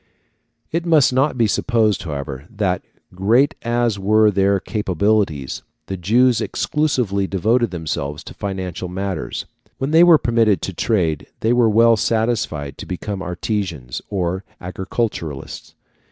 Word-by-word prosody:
] - - -49 0.3
It 170 +1 -1
must 155 -6 +4
not 135 +1 +1
be 115 - +3
supposed, 110 -2 +1
however, 70 -3 -6
that, 100 -5 -1 0.3
great 115 - +3
as 120 -3 0
were 105 +2 +4
their 100 0 +2
capabilities, 100 - -1 0.2
the 95 - -4
Jews 115 +7 +3
exclusively 125 -11 0
devoted 110 +5 +1
themselves 80 -4 -4
to - - -10
financial 95 -3 -4
matters. 95 -2 -4 0.3
When 135 +2 -2
they 165 +2 +7
were 175 -2 +8
permitted 115 -6 +2
to 95 - -3
trade 85 -7 0
they 115 +2 +2
were 120 -2 +4
well 115 +1 +5
satisfied 110 - -1
to - - -7
become 95 +2 -4
artisans 90 - -3
or 95 -1 -2 0.2
agriculturists. 90 - -4
100 Hz, 135 wpm, -20 LUFS, 90-115 Hz, 0.3 s, were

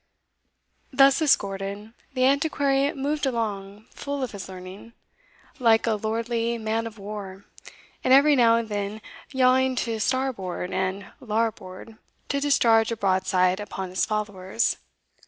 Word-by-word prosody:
) - - -47
Thus 275 +1 +5
escorted, 200 -5 0 0.2
the 255 - +1
Antiquary 280 0 +2
moved 290 0 -1
along 210 -4 -4
full 280 -1 -4
of 255 - -3
his 195 -2 -8
learning, 185 +4 -10 0.7
like 225 -3 +4
a 225 - +2
lordly 230 +2 -2
man 225 +1 -2
of 225 0 -11
war, 200 -1 -8 0.6
and 255 - +1
every 285 +2 +7
now 230 -3 +5
and 230 -1 -1
then 205 0 -4 0.3
yawing 260 0 +3
to 225 -2 -3
starboard 215 -8 -2
and 190 +1 -2
larboard 220 -2 -3 0.3
to 280 0 -1
discharge 230 -6 +3
a 230 - -2
broadside 185 -1 +1
upon 195 -3 -5
his 185 - 0
followers. 210 0 -1
225 Hz, 135 wpm, -25 LUFS, 195-260 Hz, 0.7 s, every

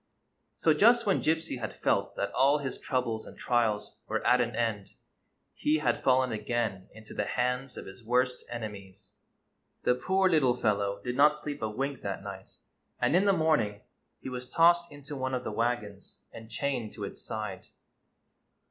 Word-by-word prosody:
So 160 - +3
just 235 +8 +5
when 195 - +2
Gypsy 160 -4 0
had 110 - -6
felt - - +1
that - - -2
all 140 +3 +4
his 140 -2 -5
troubles 120 -5 -2
and - - -12
trials 115 -4 0
were - - -2
at 125 0 +5
an 120 -2 -1
end 110 -4 -2 0.6
he 150 +1 +1
had 150 - 0
fallen 130 -1 +3
again 110 -3 -2
into 110 0 -12
the 105 - -1
hands 125 +3 -1
of - - -7
his 95 +5 -11
worst 125 +2 +1
enemies. 100 -4 -8 0.7
The - - +4
poor 190 +10 +2
little 135 -8 +3
fellow 100 -3 0
did 125 0 -3
not 150 +2 +6
sleep 150 -1 -5
a 110 - -1
wink 135 +4 -3
that 100 -1 -4
night, 95 -1 -9 0.4
and 125 +6 +2
in 190 +3 +4
the 200 - +5
morning 150 - +1 0.4
he - - -6
was 125 0 -6
tossed 170 +2 +4
into 145 0 -8
one 130 -1 -2
of 125 - -3
the - - -4
wagons 105 -3 -3
and 110 -1 -10
chained 120 -2 -2
to 105 - -7
its 100 - -6
side. 105 -3 -5
125 Hz, 175 wpm, -29 LUFS, 110-145 Hz, 0.7 s, not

